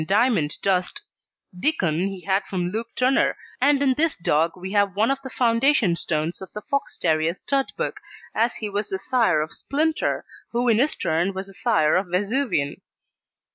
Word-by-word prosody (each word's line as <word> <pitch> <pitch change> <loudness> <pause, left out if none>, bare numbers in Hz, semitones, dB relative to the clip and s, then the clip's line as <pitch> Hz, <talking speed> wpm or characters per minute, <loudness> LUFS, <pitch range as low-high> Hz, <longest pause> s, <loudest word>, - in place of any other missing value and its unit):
Diamond 200 - +2
Dust; 185 -2 +1 0.6
Dickon 180 - +1
he 195 -2 -6
had 195 +2 +1
from 180 -2 -2
Luke 225 +3 -3
Turner, 255 +2 +2 0.2
and 285 +1 +4
in 265 -2 +4
this 315 +3 +1
dog 165 -1 +1
we 185 +1 -6
have 200 -2 +2
one 220 +5 +2
of 275 0 -2
the 265 - -7
foundation 235 - +2
stones 155 +1 -2
of 190 - -9
the 210 - -6
Fox 280 +5 -2
terrier 160 +1 +1
stud 275 +6 -1
book, - - -3 0.3
as 230 +2 +1
he 215 - -4
was 205 +1 -2
the 190 - -1
sire 225 -6 +2
of 155 - -4
Splinter, 310 +3 -1 0.3
who 240 +1 +1
in 225 -1 +4
his 285 +5 +2
turn 175 +3 0
was 190 +1 -4
the 195 - -13
sire 195 -9 +2
of 185 +1 +1
Vesuvian. 195 - 0
200 Hz, 180 wpm, -23 LUFS, 180-255 Hz, 0.6 s, and